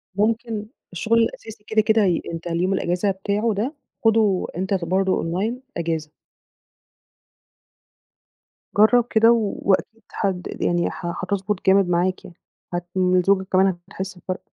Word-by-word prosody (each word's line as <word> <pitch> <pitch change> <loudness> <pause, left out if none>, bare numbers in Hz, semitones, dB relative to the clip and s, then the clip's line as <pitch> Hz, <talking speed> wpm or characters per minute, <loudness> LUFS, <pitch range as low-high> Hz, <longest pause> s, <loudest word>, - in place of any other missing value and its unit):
ممكن 220 +1 0 0.3
الشُغل 220 +6 +1
الأساسي 220 -2 -3
كده، 220 0 +3
كده 220 -1 +3
ي 175 -3 +1
أنت 165 +1 -6
اليوم 175 +3 0
الأجازة 180 +2 0
بتاعه 205 +4 -1
ده 225 +9 -2 0.3
خُده 215 -4 +3
أنت 190 +2 -1
ك 185 -3 0
برضه 190 +2 +1
Online 185 +7 -1 0.2
أجازة. 160 -2 -3 2.7
جرّب 225 +3 +5
كده 225 +1 +5
و 225 -4 +1
وأكيد 210 +3 0 0.2
هد 190 -3 0
د - - -8
يعني 175 0 +1
ه - - -9 0.2
هتضبُط 200 +1 -2
جامد 190 -1 +5
معاك 180 +2 0
يعني، 175 - -13 0.4
هت 175 0 -2
وزوجتك 185 +1 +2
كمان 190 -1 +3
هتحس 190 -1 -6
بفرْق. 185 +1 -5
195 Hz, 140 wpm, -22 LUFS, 180-215 Hz, 2.7 s, جرّب